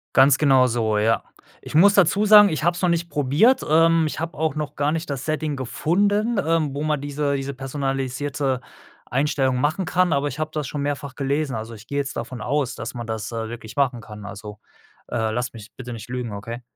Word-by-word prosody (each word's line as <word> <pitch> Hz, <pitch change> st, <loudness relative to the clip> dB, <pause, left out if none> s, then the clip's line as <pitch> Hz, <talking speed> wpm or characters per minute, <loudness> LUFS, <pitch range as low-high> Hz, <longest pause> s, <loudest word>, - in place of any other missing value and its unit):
Ganz 135 Hz, 0 st, +6 dB
genau 135 Hz, -4 st, +5 dB
so, 110 Hz, -3 st, 0 dB
ja. 110 Hz, +2 st, +2 dB, 0.4 s
Ich -, -, -10 dB
muss 200 Hz, +6 st, +6 dB
dazu 195 Hz, +2 st, +4 dB
sagen, 210 Hz, -1 st, +8 dB
ich 155 Hz, -2 st, -2 dB
habe 175 Hz, 0 st, +3 dB
es 175 Hz, -, -6 dB
noch 180 Hz, -, +3 dB
nicht 170 Hz, 0 st, 0 dB
probiert. 150 Hz, -, +3 dB
Ähm, 165 Hz, +1 st, +4 dB
ich -, -, -6 dB
habe 165 Hz, +1 st, -4 dB
auch 155 Hz, -1 st, 0 dB
noch 150 Hz, -1 st, -4 dB
gar 145 Hz, +1 st, 0 dB
nicht 165 Hz, 0 st, -3 dB
das 135 Hz, -1 st, -4 dB
Setting 155 Hz, -2 st, -2 dB
gefunden, 205 Hz, -, 0 dB
ähm, 160 Hz, -4 st, +1 dB
wo 145 Hz, -, -3 dB
man 150 Hz, -2 st, 0 dB
diese 145 Hz, 0 st, -1 dB
diese 135 Hz, 0 st, -4 dB
personalisierte 135 Hz, 0 st, -2 dB, 0.5 s
Einstellung 135 Hz, -1 st, 0 dB
machen 155 Hz, +6 st, 0 dB
kann, 180 Hz, +1 st, +1 dB
aber 140 Hz, +1 st, +1 dB
ich 140 Hz, -, -7 dB
habe 155 Hz, 0 st, -2 dB
das 150 Hz, -3 st, -3 dB
schon 145 Hz, -1 st, -4 dB
mehrfach 140 Hz, -1 st, -3 dB
gelesen. 140 Hz, +1 st, -1 dB
Also, 115 Hz, +1 st, -5 dB
ich 110 Hz, +1 st, -13 dB
gehe 140 Hz, +2 st, -3 dB
jetzt 140 Hz, -1 st, -3 dB
davon 125 Hz, +1 st, -5 dB
aus, 135 Hz, +2 st, -1 dB
dass 115 Hz, -, -6 dB
man 120 Hz, -1 st, -6 dB
das, 110 Hz, 0 st, -4 dB
äh, 115 Hz, -1 st, -3 dB
wirklich 115 Hz, -2 st, -9 dB
machen 130 Hz, -4 st, +1 dB
kann. 105 Hz, -1 st, -11 dB
Also, 105 Hz, +1 st, -9 dB, 0.5 s
äh, 110 Hz, -2 st, -1 dB
lass 120 Hz, +1 st, -2 dB
mich 110 Hz, -1 st, -12 dB
bitte 125 Hz, -2 st, -7 dB
nicht 115 Hz, 0 st, -8 dB
lügen, 125 Hz, -3 st, -4 dB
okay? 115 Hz, +4 st, -6 dB
140 Hz, 220 wpm, -23 LUFS, 120-155 Hz, 0.5 s, sagen